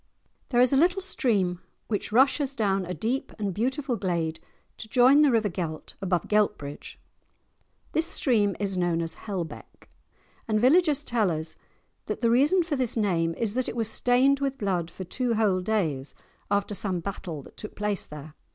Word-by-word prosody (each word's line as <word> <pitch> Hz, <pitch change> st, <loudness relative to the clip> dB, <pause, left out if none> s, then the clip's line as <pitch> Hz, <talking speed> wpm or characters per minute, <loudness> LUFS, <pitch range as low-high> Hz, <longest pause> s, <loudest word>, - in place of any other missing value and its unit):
There 245 Hz, -, +2 dB
is 250 Hz, +1 st, +4 dB
a -, -, +4 dB
little 350 Hz, +6 st, +3 dB
stream 205 Hz, -, 0 dB, 0.3 s
which 210 Hz, -1 st, -2 dB
rushes 270 Hz, +3 st, +3 dB
down 195 Hz, -5 st, 0 dB
a 180 Hz, -, -3 dB
deep 245 Hz, +5 st, -2 dB
and 205 Hz, -3 st, -2 dB
beautiful 255 Hz, -, -1 dB
glade 170 Hz, -5 st, -2 dB, 0.4 s
to 220 Hz, -, -8 dB
join 255 Hz, +5 st, +6 dB
the 295 Hz, -, +5 dB
river 225 Hz, -4 st, +2 dB
Gelt 165 Hz, -4 st, -5 dB
above 180 Hz, -3 st, 0 dB
Geltbridge; 205 Hz, -9 st, -1 dB, 0.9 s
this 320 Hz, +1 st, +1 dB
stream 225 Hz, -, +1 dB
is 200 Hz, -2 st, -1 dB
known 170 Hz, -1 st, +1 dB
as 165 Hz, 0 st, -4 dB
"Hellbeck," 185 Hz, -5 st, -7 dB, 0.6 s
and 215 Hz, -1 st, +1 dB
villagers 295 Hz, +4 st, +4 dB
tell 225 Hz, -5 st, +1 dB
us 160 Hz, -1 st, -2 dB, 0.5 s
that -, -, -4 dB
the 230 Hz, -1 st, +3 dB
reason 295 Hz, +9 st, +4 dB
for 325 Hz, -3 st, -2 dB
this 255 Hz, -3 st, 0 dB
name 165 Hz, -6 st, +1 dB
is 220 Hz, -3 st, -1 dB
that 255 Hz, +1 st, -1 dB
it -, -, -6 dB
was 225 Hz, -2 st, +1 dB
stained 255 Hz, +4 st, +3 dB
with 275 Hz, -1 st, -2 dB
blood 180 Hz, -6 st, -1 dB
for 185 Hz, -, -8 dB
two 240 Hz, +5 st, -1 dB
whole 205 Hz, -4 st, +2 dB
days 165 Hz, -10 st, -1 dB, 0.3 s
after 200 Hz, +1 st, 0 dB
some 190 Hz, -2 st, -2 dB
battle 165 Hz, -4 st, -6 dB
that -, -, -16 dB
took 210 Hz, -, -5 dB
place 210 Hz, -1 st, -1 dB
there. 150 Hz, 0 st, -10 dB
210 Hz, 175 wpm, -26 LUFS, 180-255 Hz, 0.9 s, join